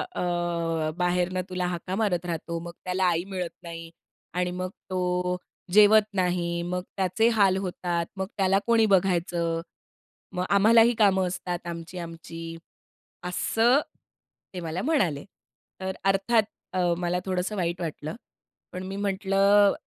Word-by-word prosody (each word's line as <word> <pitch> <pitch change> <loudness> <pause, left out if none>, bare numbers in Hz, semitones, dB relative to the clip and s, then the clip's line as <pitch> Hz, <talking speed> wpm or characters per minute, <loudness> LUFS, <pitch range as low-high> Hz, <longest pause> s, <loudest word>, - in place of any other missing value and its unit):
अ, 170 -2 -1
बाहेरनं 180 +1 +1
तुला 180 -1 -2
हाका 180 +1 -3
मारत 190 -5 0
राहतो. 170 0 -3
मग 170 - -6
त्याला 185 +1 +1
आई 170 -1 +2
मिळत 185 -3 -3
नाही 165 -1 -7 0.4
आणि 180 0 0
मग 185 +1 -3 0.2
तो 180 -1 0 0.4
जेवत 210 +1 +7
नाही. 175 -2 0
मग 180 +1 -2
त्याचे 195 +4 +2
हाल 195 -2 +5
होतात. 175 -2 -2
मग 190 0 -2
त्याला 195 0 +3
कोणी 230 -1 +5
बघायचं? 175 -3 +1 0.7
मग 180 - 0
आम्हालाही 225 +4 +6
कामं 190 -3 +4
असतात 175 -1 -4
आमची, 170 +1 -6
आमची."असं 165 -1 -8 1.8
ते 180 - -4
मला 165 +2 -3
म्हणाले. 190 - +1 0.6
तर 190 0 -2
अर्थात 195 +4 +3 0.3
अ, - - -2 0.2
मला 175 0 0
थोडंसं 185 +2 -1
वाईट 175 -1 -1
वाटलं. 155 -2 -4 0.6
पण 180 - -5
मी 195 +1 -5
म्हंटलं, 200 0 +3
180 Hz, 130 wpm, -26 LUFS, 170-195 Hz, 1.8 s, जेवत